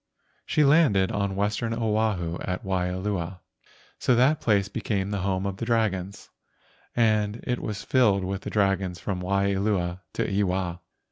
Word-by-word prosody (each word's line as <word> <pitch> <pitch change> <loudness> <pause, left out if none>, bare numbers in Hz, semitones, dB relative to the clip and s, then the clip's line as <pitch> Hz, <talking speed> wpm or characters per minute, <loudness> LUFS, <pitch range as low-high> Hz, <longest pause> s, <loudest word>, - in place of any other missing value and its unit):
She 150 - +3
landed 140 - +4
on 100 -1 -1
Western 105 +3 -1
Oahu, 105 -7 0
at 90 0 -3
Waialua, 90 -1 -2 0.6
so 125 - +3
that 130 +6 +3
place 100 -3 +2
became 100 -2 -2
the 100 - -1
home 95 0 -1
of 100 -1 -3
the 115 - -3
dragons, 100 -5 -1 0.6
and 110 -1 +2
it 125 -1 -1
was 105 -2 -4
filled 105 -7 +3
with 95 +1 -3
the - - -5
dragons 95 -4 0
from 95 -1 -3
Waialua 100 -1 0
to - - -1
Ewa. 95 -3 0
100 Hz, 145 wpm, -26 LUFS, 95-110 Hz, 0.6 s, landed